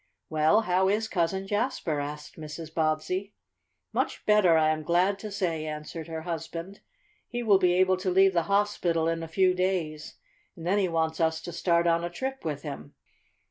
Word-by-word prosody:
"Well, 155 +7 +4
how 185 -2 +2
is 215 +2 +1
Cousin 190 0 -1
Jasper?" 205 - -1
asked 150 +1 -6
Mrs. 155 +1 -8
Bobbsey. 165 +6 -1 0.6
"Much - - -2
better, 205 -6 +5
I 155 -1 +4
am 155 0 0
glad 180 +5 +2
to 215 - -6
say," 165 -5 -2
answered 155 +2 -6
her 160 -1 -5
husband. 170 +3 -5 0.5
"He 240 0 -4
will 205 -4 +5
be 180 -2 +3
able 185 +1 +3
to 185 +1 -2
leave 190 +1 +5
the 170 - +3
hospital 200 -5 +1
in 165 0 -1
a 165 - -5
few 185 +3 +3
days, 180 -5 -2 0.4
and 165 - -9
then 195 +4 +2
he 190 - +2
wants 160 -1 -1
us 160 -1 +1
to 175 - -6
start 170 0 +2
on 170 0 +2
a 175 - -2
trip 265 +9 -5
with 150 -3 -4
him." 140 - -8
170 Hz, 185 wpm, -27 LUFS, 160-190 Hz, 0.6 s, better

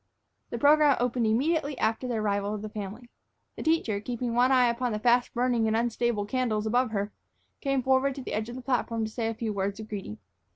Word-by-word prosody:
The 235 - -4
program 295 +2 +5
opened 245 -1 +1
immediately 285 +5 +1
after 225 +3 0
the 245 - -2
arrival 205 -1 0
of 210 - -6
the 215 - -5
family. 215 +4 -7 0.4
The - - -7
teacher, 315 -11 +1
keeping 240 +1 -3
one 250 +2 +4
eye 255 -1 +5
upon 240 0 0
the - - -1
fast 245 +2 +3
burning 240 -2 +2
and 220 0 +2
unstable 235 -2 0
candles 220 -2 -1
above 245 +3 +2
her, 205 -1 -2 0.5
came 275 -2 0
forward 265 +1 +2
to 270 - -7
the - - -5
edge 215 +2 -2
of 240 - -7
the 255 - -8
platform 235 -3 0
to 215 - -6
say 225 0 -2
a 225 - -2
few 220 -1 -3
words 200 +1 -2
of 220 - -7
greeting. 195 - -6
235 Hz, 220 wpm, -28 LUFS, 215-255 Hz, 0.5 s, program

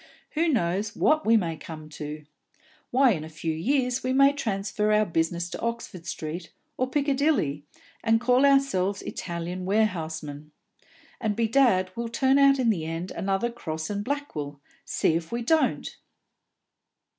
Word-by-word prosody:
Who 325 +2 +1
knows 205 - 0
what 310 -4 +2
we 225 0 +6
may 170 -6 -1
come 155 0 -9
to? 150 0 -7 0.6
Why, 260 0 +5
in 160 -7 -2
a 160 - -8
few 160 +1 -3
years 250 - 0
we 255 0 0
may 275 +1 +6
transfer 210 -4 -1
our 215 0 +4
business 170 0 -1
to - - -6
Oxford 230 -7 -4
Street 160 +2 -5 0.2
or 255 0 -1
Piccadilly, 275 - +1 0.4
and 225 0 +3
call 250 +3 +3
ourselves 270 -9 +3
Italian 175 +1 -5
warehousemen; 160 -7 -1 0.7
and 215 -3 -1
bedad, 225 -5 +3
we'll 235 0 -3
turn 265 +4 +3
out 275 0 +6
in 245 -4 +3
the 170 -7 -2
end 165 +3 -4
another 195 +5 -1
Crosse 160 -7 -5
and 205 0 -2
Blackwell, 180 - -4 0.3
see - - +1
if 165 0 -2
we 235 0 -2
don't!" 320 +6 +1
205 Hz, 150 wpm, -26 LUFS, 165-255 Hz, 0.7 s, we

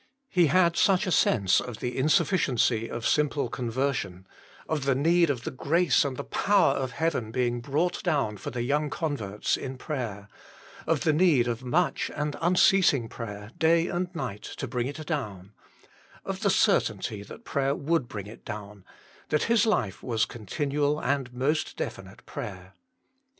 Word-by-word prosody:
He 175 -3 +4
had 170 +3 +3
such 195 +1 +3
a 185 - -1
sense 100 - +3
of 125 -3 -7
the 125 0 -4
insufficiency 130 - +2
of 115 -1 -5
simple 150 -1 +1
con 120 -2 -4
version; 115 -8 -2 0.4
of 150 -4 -2
the 135 -1 +3
need 165 +4 +3
of 125 -5 -2
the - - -4
grace 160 +4 +2
and 135 -3 -3
the - - -4
power 200 -8 +3
of 130 -2 -3
heaven 160 -8 -1
being 120 0 -1
brought 150 +8 -1
down 140 - 0
for 100 - -6
the 120 0 -3
young 145 +4 0
converts 115 - -2
in 130 0 -6
prayer; 115 -9 -5 0.6
of - - +1
the 155 - +2
need 150 -7 +4
of 120 +1 -3
much 160 +8 0
and 150 0 -2
unceasing 175 -7 +4
prayer, 105 -2 -7
day 165 +2 +3
and 175 +1 -2
night, 105 -10 -4
to - - -6
bring 125 0 -2
it 150 +3 -6
down; 105 - -4 0.7
of - - -4
the - - +2
certainty 105 -2 +1
that 225 - -12
prayer 140 0 0
would 160 -3 0
bring 105 -4 -6
it 110 +3 -12
down 105 -2 -8 0.5
that 150 - +1
his 230 -1 +3
life 105 - 0
was 115 -3 0
continual 145 +6 -1
and 135 -2 -1
most 135 +6 -1
definite - - -6
prayer. 95 -1 -7
135 Hz, 165 wpm, -27 LUFS, 115-160 Hz, 0.7 s, He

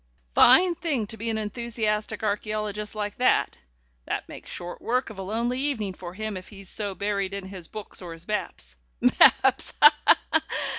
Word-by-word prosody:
Fine 345 +9 +7
thing 310 -9 -2
to 215 - -5
be 225 +1 -3
an 220 - 0
enthusiastic 220 -1 -2
archæologist 210 0 -2
like 210 -1 -4
that. 250 - +2 0.5
That - - -3
makes - - -11
short 175 0 -7
work 250 0 -1
of 200 - -10
a - - -3
lonely 230 +6 -1
evening 240 -9 -1
for 175 -1 -9
him 215 0 -4
if 185 0 -8
he's 195 -3 -8
so 205 -3 0
buried 200 -1 -2
in 200 -1 -6
his 190 -3 -8
books 215 -2 -8
or 175 -2 -7
his 165 +2 -13
maps 65 - -3 0.2
Mapps, - - +4
ha! - - +9
ha! - - +4
210 Hz, 180 wpm, -26 LUFS, 195-225 Hz, 0.5 s, ha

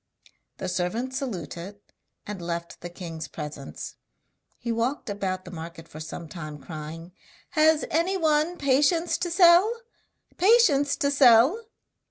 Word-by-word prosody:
The 190 - -4
servant 185 +8 -2
saluted 205 - -5 0.5
and 205 -3 -6
left 170 0 -5
the 175 - -6
king's 165 -3 -7
presence. 150 -3 -8 0.6
He 235 - -4
walked 230 +1 -1
about 185 -2 -3
the 180 - -9
market 165 -1 -9
for 155 - -11
some 160 +1 -7
time 155 -3 -8
crying: 160 +3 -8 0.4
'Has 310 -1 +4
anyone 330 -1 +1
patience 295 +5 +2
to 355 - -2
sell? 345 +4 +6 0.7
patience 360 - +4
to 280 - 0
sell?' 275 - +5
230 Hz, 125 wpm, -26 LUFS, -, 0.7 s, sell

